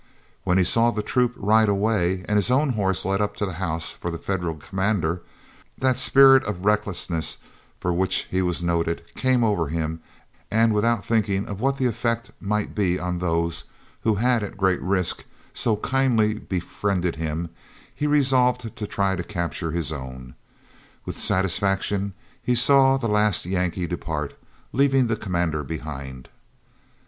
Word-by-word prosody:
When 90 - +2
he 95 - +4
saw 115 +6 +3
the 105 -3 -2
troop 125 +1 +1
ride 110 +2 +3
away, 100 -3 +1
and 105 - 0
his 105 +1 +3
own 140 +4 +3
horse 100 -6 0
led 100 +1 0
up 105 - -1
to 105 - -1
the 95 - -5
house 85 -3 -2
for 85 - -6
the 85 - -4
Federal 85 -3 -3
commander, 95 0 -1 0.6
that 130 -1 +2
spirit 135 -1 +7
of 100 -2 -4
recklessness 100 -6 0 0.4
for 90 - -1
which 95 +2 +1
he 95 - +1
was 90 -1 -1
noted 85 -1 0
came 130 -2 +2
over 100 -8 +1
him, 80 +1 -3 0.5
and 110 +1 +3
without 115 0 +1
thinking 105 -3 +1
of 100 0 -6
what 135 +1 +1
the 130 - 0
effect 115 0 -1
might 105 +1 -2
be 90 -4 +1
on 90 -1 -3
those 85 -1 -1 0.4
who 110 -2 +2
had, 120 +2 +2
at 100 -1 -6
great 95 -2 +1
risk, 95 -2 +1 0.3
so 110 - +1
kindly 115 -2 +1
befriended 90 -2 -2
him, 80 +1 -3 0.4
he 150 - -2
resolved 125 -5 +2
to 105 - -5
try 100 -1 0
to 90 - -4
capture 85 -3 -3
his 80 -2 -1
own. 65 -3 -8 0.7
With - - -6
satisfaction 95 +2 0 0.3
he 125 - +1
saw 135 +2 +5
the 125 -3 -2
last 105 -3 +2
Yankee 90 -1 -1
depart, 80 -4 -4 0.4
leaving 135 0 +3
the 115 -1 0
commander 85 -7 -2
behind. 70 -4 -7
100 Hz, 160 wpm, -24 LUFS, 85-115 Hz, 0.7 s, spirit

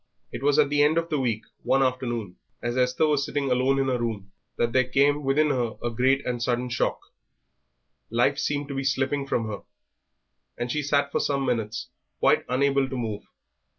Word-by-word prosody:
It - - -6
was 145 +1 +3
at 150 -2 +4
the 145 0 +2
end 150 +2 +4
of 165 0 0
the 150 - +1
week, 115 -4 -1 0.2
one 135 - +2
afternoon, 120 -7 -2 0.3
as 120 0 -1
Esther 125 +4 +2
was 150 -2 +2
sitting 140 -2 -2
alone 130 +2 +2
in 135 - +1
her 125 -2 0
room, 105 -5 -4 0.3
that 120 -1 0
there 130 -1 +3
came 145 +2 +3
within 145 +3 +2
her 120 -4 -1
a 120 - -1
great 130 +4 +2
and 120 -1 -2
sudden 125 +1 0
shock 115 - 0 1.1
life - - +2
seemed 145 -1 -1
to - - -4
be 135 0 -2
slipping 135 +1 0
from 115 -4 0
her, 105 -2 -5 1.0
and 120 0 -3
she 150 - 0
sat 140 0 +1
for - - 0
some 140 -1 0
minutes 115 -2 -2 0.3
quite - - +3
unable 135 +1 +2
to 130 - -4
move. 110 -4 -3
130 Hz, 195 wpm, -26 LUFS, 120-140 Hz, 1.1 s, at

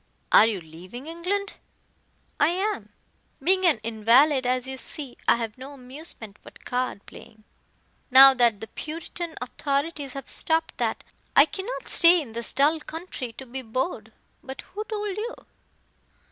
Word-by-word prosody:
"Are 220 - +8
you 215 -4 -2
leaving 180 - -11
England?" 365 +5 -3 0.8
"I 290 - +5
am. 385 +5 -2 0.5
Being 370 +5 +3
an 315 - +4
invalid 245 +5 +3
as 255 0 0
you 265 0 -5
see, 275 -3 -4
I - - +6
have 230 0 -5
no 270 +2 -9
amusement 255 -5 -9
but - - -16
card 250 -5 -3
playing. 215 0 -14 0.7
Now 270 +1 +9
that 235 -5 +2
the 220 - -6
Puritan 330 +3 -6
authorities 280 +2 -3
have 275 -2 -7
stopped 320 +2 +1
that, - - -1 0.3
I 280 - +8
cannot 385 +10 -5
stay 345 +1 +6
in 255 -8 -7
this 235 0 +1
dull 295 +4 +3
country 310 -6 -7
to 265 - -10
be 260 +2 -6
bored. 225 - -3 0.3
But 265 0 -8
who 420 +2 -7
told 420 -3 -4
you?" 465 +3 -4
275 Hz, 150 wpm, -25 LUFS, 240-335 Hz, 0.8 s, Now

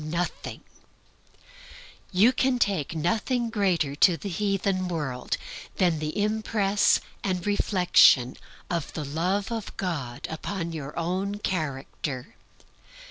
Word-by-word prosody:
Missionaries 170 +3 -4 1.7
can 260 -1 +2
take 190 - 0
nothing 225 - 0
greater 180 -9 +1
to 175 +1 +5
the 200 - -5
heathen 195 0 0
world 150 -8 -2 0.4
than 175 -4 +2
the 155 +5 -3
impress 210 -1 +2 0.2
and 185 -2 -1
reflection 180 - +5 0.3
of 170 -3 -2
the 155 - -4
Love 180 +9 -1
of 225 -3 -5
God 145 -10 -3
upon 170 +1 -4
their 150 -3 -6
own 185 +4 -1
character. 140 -7 -4
180 Hz, 105 wpm, -26 LUFS, 155-205 Hz, 1.7 s, to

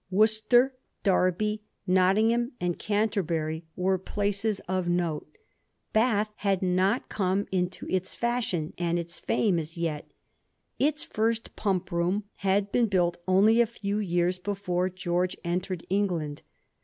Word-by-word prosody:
Worcester, 220 +6 +4 0.3
Derby, 200 +2 +2 0.2
Nottingham, 215 +7 +3
and 175 -1 -1
€anterbury 175 -7 -1
were 185 +1 +1
places 205 +2 -1
of 185 0 -2
note. 175 - -1 0.6
Bath 215 -2 +2
had 195 -2 0
not 185 +5 +2
come 195 0 0
into 180 -1 -1
its 185 0 -2
fashion 235 -10 -1
and 170 -1 +1
its 170 0 -5
fame 190 -6 +1
as 160 +1 -6
yet. 160 -3 -3 0.7
Its 300 +2 +1
first 225 +1 -1
pump 190 -3 -1
room 175 +4 0
had 200 +1 +1
been 235 -3 +2
buUt 175 -3 +2
only 210 +5 +5
a 235 - +3
few 210 -2 -3
years 180 -2 0
before 185 -2 -1
George 180 0 -1
entered 180 0 -2
England. 175 -7 -1
190 Hz, 130 wpm, -27 LUFS, 175-210 Hz, 0.7 s, only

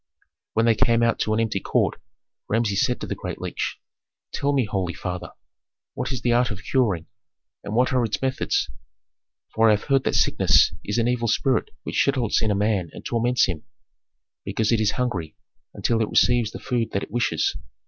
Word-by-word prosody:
When 115 +1 +2
they 115 - +5
came 115 0 +3
out 115 -1 +2
to 110 - 0
an - - 0
empty 110 -3 0
court, - - 0 0.5
Rameses 105 -3 +1
said 125 - 0
to - - -3
the - - -3
great - - -6
leech, - - -3 0.6
"Tell 140 - 0
me, 135 -4 +2
holy 95 -4 -2
father, 90 -1 -5 0.6
what - - -3
is 130 -4 -4
the 120 - +2
art 120 +1 +3
of 105 -2 -6
curing, 105 - +1 0.6
and 105 - -4
what 125 +2 +2
are 125 -1 +3
its 110 -2 -1
methods. 130 - 0 0.9
For 115 0 +4
I - - +6
have 105 - -1
heard 135 -1 +3
that - - +1
sickness - - +4
is 105 - -2
an 115 0 +2
evil 120 -1 0
spirit 130 +3 +1
which - - +1
settles 130 -5 +1
in 110 - +1
a 105 - +2
man 100 -4 0
and - - -11
torments 120 +1 +2
him, 85 -5 -4 0.8
because 110 0 -1
it 115 -2 +3
is 110 -1 +2
hungry, 95 -11 -3 0.4
until 115 -1 0
it 110 - 0
receives 120 -3 +3
the - - -8
food 120 -3 -2
that 100 - -1
it - - -9
wishes. 120 +2 0
115 Hz, 200 wpm, -24 LUFS, 105-125 Hz, 0.9 s, I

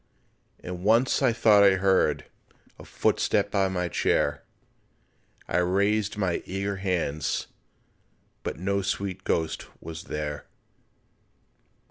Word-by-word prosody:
And 90 0 -7
once 115 +7 +3
I 130 -3 +4
thought 110 -3 +5
I 100 -1 +6
heard 95 0 +2 0.5
A - - -10
footstep - - +1
by 95 -1 +2
my 90 -1 -2
chair, - - +1 1.1
I - - 0
raised 100 +4 +1
my 95 -4 0
eager 100 +1 -3
hands, 85 -6 -1 1.0
But - - -4
no 100 +3 -1
sweet 95 0 -3
ghost 80 -1 -1
was 80 0 -8
there. 75 -1 -5
95 Hz, 110 wpm, -26 LUFS, 90-100 Hz, 1.1 s, I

